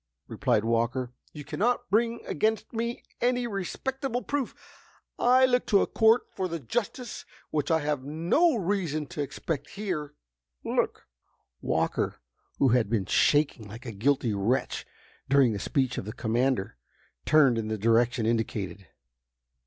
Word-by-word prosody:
replied 115 -4 +1
Walker. 120 +2 0 0.2
"You 145 -2 -9
can - - -6
not 245 +3 +1
bring 230 +2 +1
against 220 +10 -1
me 235 +1 -3 0.2
any 245 0 +2
respectable 245 +5 -3
proof. 285 -4 -2 0.6
I 255 +2 +5
look 250 -1 +1
to 200 - +4
a - - +1
court 225 +2 +4
for 190 - -2
the 165 -1 -4
justice 240 - -3 0.3
which 150 -2 -1
I 160 -1 +3
have 145 -2 -1
no 170 - +2
reason 175 -7 -1
to 165 -1 -5
expect 145 +1 -4
here." 175 -8 -3 0.5
"Look!" - - -1 0.6
Walker, - - -1 0.4
who 135 - +4
had 120 -3 +3
been 105 -4 0
shaking 140 0 +2
like 115 +5 -10
a 115 - -4
guilty 120 +2 +1
wretch 105 +7 -1 0.4
during 135 -4 +5
the 100 - -3
speech 130 +2 0
of - - -6
the 105 - -5
commander, 120 - 0 0.5
turned 140 -6 +4
in 110 - -3
the 110 0 -2
direction 115 +2 +2
indicated. 100 -4 -2
145 Hz, 145 wpm, -28 LUFS, -, 0.6 s, I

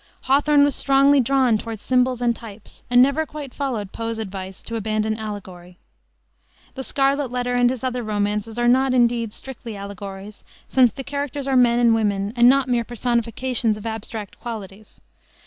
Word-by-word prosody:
Hawthorne 285 +2 +4
was 285 -1 +3
strongly 275 +1 +4
drawn 255 -3 +2
toward 225 0 -6
symbols 250 +2 +1
and 235 -1 +2
types, 215 -2 -12
and 245 0 +6
never 280 +4 +1
quite 290 -4 -8
followed 235 -9 -3
Poe's 230 0 -4
advice 190 -3 -7
to 230 - -6
abandon 215 0 -1
allegory. 185 -4 -8 1.0
The 265 - -6
Scarlet 275 0 0
Letter 245 0 -2
and 245 0 +3
his 255 0 -4
other 250 -1 -2
romances 210 +1 -2
are 240 0 +1
not, 260 +1 +3
indeed, 235 -2 +2
strictly 235 -2 -8
allegories, 200 +1 -8 0.2
since 255 -3 +4
the 270 - -7
characters 280 0 -4
are 270 -1 0
men 240 -2 +4
and 235 -1 +4
women 205 -2 0
and 240 0 +6
not 270 0 +3
mere 240 -2 +1
personifications 235 -1 -1
of 215 - -10
abstract 220 -2 -6
qualities. 215 -3 -9
235 Hz, 165 wpm, -22 LUFS, 215-260 Hz, 1.0 s, and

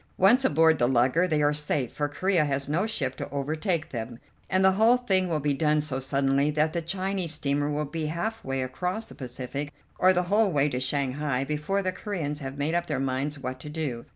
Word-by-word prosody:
'Once 235 +8 +5
aboard 160 - +4
the 120 - +3
lugger' 130 +8 +3
they 155 -3 +1
are 145 0 +3
safe, 145 -4 -1
for 145 -1 -1
Corea 185 +2 +1
has 140 -2 -1
no 170 +9 0
ship 135 - -2
to - - -5
overtake 155 +5 -2
them, 115 -1 -5 0.3
and 190 0 +3
the 190 - +7
whole 220 +6 +4
thing 190 -7 +1
will 160 -2 0
be 145 0 0
done 150 +1 +2
so 145 -3 -1
suddenly 135 +1 +1
that 155 +1 +1
the 170 - -1
Chinese 185 -1 -1
steamer 145 0 0
will 150 +1 -1
be 155 +1 -4
half 220 +8 -3
way 135 -1 -2
across 180 - -3
the - - -11
Pacific, 130 +3 -5 0.3
or 185 - +6
the 180 -1 +2
whole 205 +3 +2
way 145 -2 +2
to 125 -3 -2
Shanghai, 135 0 -1
before 150 +8 -1
the 185 - 0
Coreans 170 -7 -4
have 135 -1 -6
made 145 +3 -1
up 175 0 0
their 145 -4 -1
minds 135 +2 -2
what 130 -1 -5
to 150 - -8
do. 145 -7 -3
150 Hz, 220 wpm, -27 LUFS, 135-180 Hz, 0.3 s, the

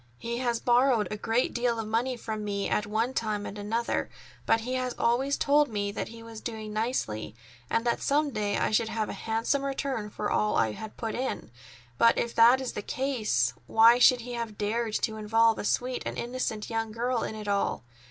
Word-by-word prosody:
He 235 - -4
has 240 -2 0
borrowed 245 -2 +3
a - - -1
great 225 +4 0
deal 240 -1 0
of 225 - -3
money 240 +3 0
from 220 -2 -5
me 200 -1 -2
at 210 - 0
one 225 +4 0
time 215 -4 -2
and - - -6
another, 220 +3 -2 0.4
but 225 - +3
he 250 +3 -4
has 255 -1 -2
always 260 +4 +1
told 295 0 +3
me 205 -2 -2
that - - -4
he 230 0 -11
was 225 -1 -9
doing 220 -2 -6
nicely 210 - -2 0.3
and 230 - 0
that 235 - 0
some 290 +1 +1
day 210 -3 -1
I - - 0
should 220 +1 +2
have 220 -2 -2
a - - -4
handsome 230 +5 -1
return 270 -5 -2
for 210 0 -3
all 210 - +1
I 110 - +2
had 215 - -8
put 225 -2 -3
in. 255 - -3 0.5
But 230 - +5
if 235 - -1
that 235 +3 +6
is 260 -2 -4
the - - -4
case, 215 - 0
why 230 +2 +6
should 250 0 +6
he 245 +1 -7
have 230 -3 -4
dared 220 +1 -1
to 220 -1 -1
involve 225 +1 +3
a - - -3
sweet 250 +4 0
and - - -5
innocent 235 -3 -3
young 225 -1 -2
girl 240 +1 -1
in 220 - -4
it 210 -1 -7
all? 200 -9 0
230 Hz, 210 wpm, -28 LUFS, 215-245 Hz, 0.5 s, that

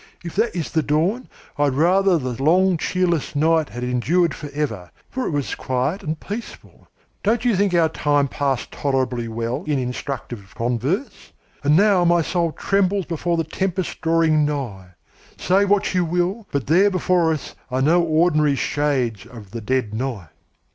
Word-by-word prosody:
If 170 - -7
that 225 0 +1
is 170 -4 -3
the 160 - +2
dawn, 165 +12 0 0.3
I 145 - +4
would 135 -2 0
rather 185 +4 +3
the 125 -4 -4
long 185 +4 +4
cheerless 175 -3 -1
night 160 +1 +2
had 120 +1 -6
endured 145 +7 +1
forever, 140 - -4 0.2
for 260 -1 -2
it - - -1
was 145 -4 -2
quiet 130 +9 -2
and 155 0 -4
peaceful. 215 +4 -8 0.3
Don't 225 +4 +1
you 240 -4 +3
think 195 -1 +1
our 165 -2 +4
time 145 -2 +1
passed 135 -2 -2
tolerably 130 -4 -1
well 115 +6 -3
in 150 -2 +1
instructive 125 -5 -5
converse? 125 - -2 0.3
And 145 +1 +4
now 200 -2 +4
my 170 -1 +3
soul 170 0 0
trembles 195 +2 0
before 170 +1 -1
the 165 - +1
tempest 185 +3 -3
drawing 160 -2 +3
nigh. 110 - -4 0.4
Say 195 +2 +2
what 200 -1 +1
you 180 -1 +2
will, 180 +6 -1
but 140 -4 -1
there 185 +7 +4
before 180 -3 +2
us 155 -3 -4 0.2
are 130 +1 0
no 170 +5 +4
ordinary 155 -3 +2
shades 130 -8 -1
of 115 -6 -12
the 115 0 -6
dead 120 -1 -1
night." 110 - -4
155 Hz, 170 wpm, -21 LUFS, 130-180 Hz, 0.4 s, I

